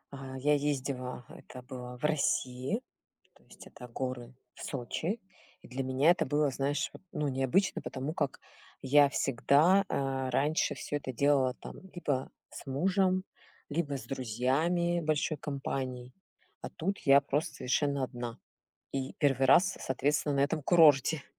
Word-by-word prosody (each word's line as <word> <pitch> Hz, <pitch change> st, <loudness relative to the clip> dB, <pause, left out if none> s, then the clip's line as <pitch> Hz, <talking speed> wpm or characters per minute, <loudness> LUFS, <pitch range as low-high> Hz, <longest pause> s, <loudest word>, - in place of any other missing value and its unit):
А, 130 Hz, -1 st, -7 dB
я 145 Hz, +3 st, +2 dB
ездила, 135 Hz, -3 st, -2 dB
это 125 Hz, -, -12 dB
было 125 Hz, -1 st, -8 dB
в 125 Hz, -, -18 dB
России, 140 Hz, -, 0 dB, 0.5 s
то -, -, -25 dB
есть -, -, -15 dB
это 125 Hz, -, -11 dB
горы 125 Hz, 0 st, -5 dB, 0.2 s
в -, -, -14 dB
Сочи. 155 Hz, -, -3 dB, 0.4 s
И -, -, -12 dB
для 130 Hz, +2 st, -4 dB
меня 130 Hz, +5 st, +4 dB
это 175 Hz, -, +1 dB
было, 145 Hz, 0 st, +2 dB
знаешь 140 Hz, +2 st, -1 dB
вот, -, -, -12 dB
ну, 150 Hz, -1 st, -1 dB
необычно, 135 Hz, +9 st, +1 dB
потому 135 Hz, +4 st, -4 dB
как 145 Hz, -5 st, -2 dB, 0.4 s
я 140 Hz, +1 st, +5 dB
всегда, 145 Hz, +9 st, +3 dB
э, 135 Hz, -1 st, -1 dB
раньше 145 Hz, +5 st, +1 dB
всё 145 Hz, -, -3 dB
это 140 Hz, -2 st, -5 dB
делала 130 Hz, 0 st, +2 dB
там -, -, -10 dB, 0.2 s
либо 140 Hz, -6 st, -2 dB, 0.2 s
с -, -, -10 dB
мужем, 185 Hz, +6 st, +1 dB, 0.5 s
либо 145 Hz, -2 st, -1 dB
с 135 Hz, -, -9 dB
друзьями 140 Hz, +8 st, 0 dB
большой 155 Hz, 0 st, 0 dB
компанией, 130 Hz, -3 st, -4 dB, 0.5 s
а -, -, -6 dB
тут 195 Hz, +5 st, -3 dB
я 140 Hz, -1 st, +6 dB
просто 145 Hz, +2 st, -2 dB
совершенно 140 Hz, +2 st, 0 dB
одна. 120 Hz, -2 st, -5 dB, 0.6 s
И 135 Hz, -1 st, -3 dB
первый 135 Hz, -3 st, +2 dB
раз, 170 Hz, +8 st, +5 dB
соответственно, 145 Hz, +2 st, 0 dB
на -, -, +2 dB
этом 150 Hz, +2 st, +1 dB
курорте. 155 Hz, -2 st, +5 dB
140 Hz, 150 wpm, -31 LUFS, 130-150 Hz, 0.6 s, я